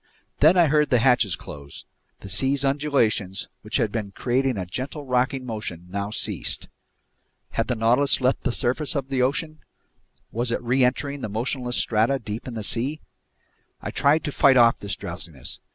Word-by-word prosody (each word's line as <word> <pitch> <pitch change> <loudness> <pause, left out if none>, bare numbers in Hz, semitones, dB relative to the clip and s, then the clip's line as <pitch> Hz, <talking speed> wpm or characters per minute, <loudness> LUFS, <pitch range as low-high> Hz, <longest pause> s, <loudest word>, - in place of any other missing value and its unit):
Then 160 +5 +6
I 175 - +6
heard 150 0 +2
the 125 - +4
hatches 120 -6 +3
close. 70 -1 -10 0.4
The - - -9
sea's 135 +7 +1
undulations, 135 -9 0
which - - -1
had 105 - 0
been 105 -3 -4
creating 130 +1 0
a 95 - -3
gentle 135 - -5
rocking 130 +1 0
motion, 105 -7 -5
now 100 +1 -3
ceased. 105 - 0 0.8
Had - - -1
the 125 - 0
Nautilus 120 +5 +3
left 130 +1 +1
the 130 - -1
surface 130 +6 -1
of 135 -2 -2
the 135 -2 0
ocean? 155 +4 0 0.7
Was 120 +1 0
it - - 0
reentering 130 +3 +1
the 110 - -4
motionless 125 +3 -2
strata 115 +5 +2
deep 110 -1 -6
in 125 - -6
the 110 - -4
sea? 130 +8 -1 0.8
I - - -5
tried 150 +3 +3
to 150 - -3
fight 135 -2 +5
off 115 -1 +5
this 100 - -3
drowsiness. 80 -6 -8
125 Hz, 170 wpm, -24 LUFS, 110-140 Hz, 0.8 s, Then